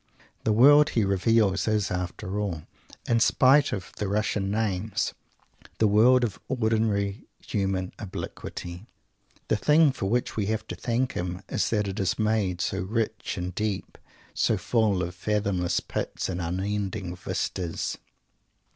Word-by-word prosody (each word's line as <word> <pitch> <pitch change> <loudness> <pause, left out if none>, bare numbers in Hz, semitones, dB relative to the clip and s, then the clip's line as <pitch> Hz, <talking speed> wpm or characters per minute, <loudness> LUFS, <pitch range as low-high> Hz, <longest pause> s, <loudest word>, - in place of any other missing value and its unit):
The 110 - +3
world 145 +7 +7
he 110 -3 +1
reveals 100 +1 +2
is, 105 -2 +1
after 90 +2 -3
all, 90 -7 -3 0.4
in 115 -1 +3
spite 135 +5 +5
of 95 -3 -5
the 105 - -2
Russian 100 -1 0
names, 105 -1 -1 0.6
the 110 - +3
world 120 +5 +5
of 110 -5 -2
ordinary 110 -4 0 0.2
human 95 -3 -1
obliquity. 90 -1 -7 0.6
The 110 - +2
thing 150 +6 +5
for 100 -7 -3
which 120 +4 0
we 105 -3 -1
have 110 0 -1
to - - -4
thank 120 +2 -1
him 90 +2 -4
is - - 0
that 105 -2 0
it 95 - -4
is 95 -3 0
made 105 -5 0
so - - -1
rich 110 +2 -2
and 90 0 -3
deep, 105 0 -3 0.3
so - - +2
full 105 -6 +1
of 90 0 -4
fathomless 95 -2 0
pits - - -4
and 90 -1 -3
unending 95 +1 -2
vistas. 90 -1 -3
105 Hz, 145 wpm, -26 LUFS, 95-110 Hz, 0.6 s, world